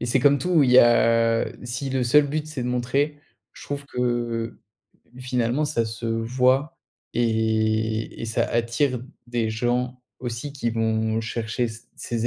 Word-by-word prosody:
et 120 - -2
c'est 120 +3 +2
comme 140 +2 +5
tout, 175 -3 +3
il 130 - +3
y 125 - +8
a 115 -1 +4 0.2
si 125 +3 -3
le 130 -1 0
seul 145 +4 +5
but 150 +2 -2
c'est 155 -5 -5
de 125 - -2
montrer, 135 +5 0 0.3
je - - -13
trouve 145 0 -5
que 120 -3 -2 0.6
finalement 125 +2 0
ça 145 -6 0
se 115 +1 -5
voit 125 +7 +1 0.4
et 110 -1 0
et - - -3
ça 115 +1 0
attire 120 +3 0 0.3
des 120 -2 -1
gens 125 +3 -1 0.2
aussi 120 +3 -4
qui 125 -4 -2
vont 110 0 0
chercher 115 +1 -2
c 115 +1 -10
ces 120 -1 -2
120 Hz, 160 wpm, -24 LUFS, 115-130 Hz, 0.6 s, y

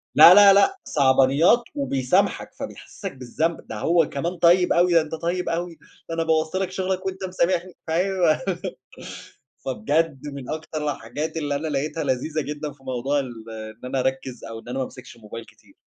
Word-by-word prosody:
لا، 175 - +10
لا، 200 0 +9
لأ، 290 - +4
صعبانيات 140 - +4
وبيسامحك، 195 - 0
فبيحسّسك 265 -7 -8
بالذنب، 155 +7 -3
ده 110 - -6
هو 165 +4 +2
كمان 170 +6 -3
طيب 175 +2 +4
أوي، 175 0 +3
ده 165 - +6
أنت 155 +1 -5
طيب 175 +2 -2
أوي، 170 0 -3 0.3
ده 165 - -3
أنا 165 - 0
بوَّظت 160 +1 0
لك 190 -1 -1
شغلك 190 0 -2
وأنت 190 0 -4
مسامحني، 180 -1 0 0.2
أيوه 175 -2 +2 1.2
فبجد 140 +4 -1
من 140 -3 -8
أكتر 155 -1 -3
الحاجات 145 +9 -5
اللي 145 -2 -1
أنا 155 +3 -2
لقيتها 150 +2 -2
لذيذة 140 +4 -1
جدًا 150 0 -5
في 135 -1 -23
موضوع 130 +3 -1
ال 125 -3 -6 0.2
إن 110 +1 -9
أنا 130 - -1
أركّز، 130 -1 -3
أو 115 0 -7
إن 115 - -13
أنا 125 - -4
ما 130 - 0
أمسكش 125 -1 -12
الموبايل 115 0 -9
كتير. - - -22
155 Hz, 175 wpm, -23 LUFS, 135-175 Hz, 1.2 s, لا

